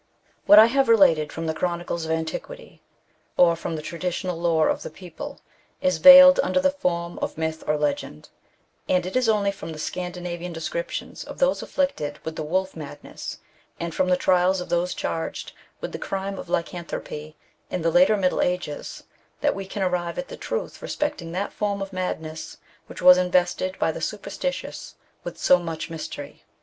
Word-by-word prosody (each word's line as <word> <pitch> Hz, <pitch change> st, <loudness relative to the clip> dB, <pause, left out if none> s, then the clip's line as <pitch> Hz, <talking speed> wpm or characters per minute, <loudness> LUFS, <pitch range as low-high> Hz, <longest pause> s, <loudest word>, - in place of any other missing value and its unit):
What 205 Hz, -, +9 dB
I 215 Hz, -, +11 dB
haye 270 Hz, +4 st, +3 dB
related 190 Hz, -, +4 dB
from 165 Hz, -, -5 dB
the 160 Hz, -, -1 dB
chronicles 170 Hz, -1 st, -2 dB
of 160 Hz, -, -3 dB
antiquity, 160 Hz, -, -5 dB, 0.6 s
or 170 Hz, -1 st, +5 dB
from 165 Hz, 0 st, -4 dB
the 155 Hz, -, -6 dB
traditional 175 Hz, +3 st, -3 dB
lore 165 Hz, -2 st, +3 dB
of -, -, 0 dB
the -, -, -6 dB
people, 170 Hz, 0 st, -9 dB, 0.4 s
is 275 Hz, -1 st, +1 dB
veiled 275 Hz, 0 st, +10 dB
under -, -, +1 dB
the 280 Hz, 0 st, +3 dB
form 175 Hz, -10 st, -2 dB
of -, -, -4 dB
myth 160 Hz, 0 st, -3 dB
or 150 Hz, -, +2 dB
legend; 145 Hz, -, -3 dB, 0.6 s
and 180 Hz, -1 st, +2 dB
it 185 Hz, -, -5 dB
is 255 Hz, -3 st, +2 dB
only 205 Hz, -2 st, +2 dB
from 160 Hz, -5 st, -8 dB
Scandinavian 180 Hz, +1 st, -5 dB
descriptions -, -, -5 dB
of -, -, -10 dB
those -, -, +2 dB
afflicted 155 Hz, -, -2 dB
with 160 Hz, 0 st, -4 dB
the -, -, -4 dB
wolf 185 Hz, +5 st, -1 dB
madness, 150 Hz, -3 st, -8 dB, 0.4 s
and 170 Hz, -1 st, -4 dB
from 185 Hz, -, +1 dB
the 180 Hz, -, +4 dB
trials 185 Hz, +1 st, +3 dB
of 180 Hz, -, -6 dB
those 175 Hz, +1 st, 0 dB
charged 165 Hz, -, -4 dB, 0.3 s
with -, -, -4 dB
the -, -, -6 dB
crime 195 Hz, 0 st, -4 dB
of -, -, -9 dB
lycanthropy 170 Hz, -3 st, -4 dB, 0.3 s
in 180 Hz, -, -3 dB
the 165 Hz, -, +2 dB
later 265 Hz, -5 st, +5 dB
Middle 185 Hz, -2 st, +1 dB
Ages, 180 Hz, -5 st, -3 dB, 0.4 s
that -, -, +2 dB
we 195 Hz, -1 st, -6 dB
can 195 Hz, 0 st, -3 dB
arrive 175 Hz, -2 st, -1 dB
at 270 Hz, -, -4 dB
the -, -, -7 dB
truth -, -, -5 dB
respecting 180 Hz, -, -3 dB
that 195 Hz, +3 st, -3 dB
form 205 Hz, -1 st, -1 dB
of 195 Hz, 0 st, -6 dB
mad 185 Hz, -2 st, -2 dB
ness 155 Hz, 0 st, -8 dB, 0.3 s
which -, -, -9 dB
was 180 Hz, 0 st, +9 dB
invested 180 Hz, +1 st, +1 dB
by -, -, +1 dB
the -, -, -7 dB
superstitious -, -, -4 dB, 0.3 s
with -, -, -7 dB
so 180 Hz, -, +5 dB
much 165 Hz, -2 st, -5 dB
mystery. 145 Hz, -3 st, -7 dB
180 Hz, 180 wpm, -24 LUFS, 165-195 Hz, 0.6 s, I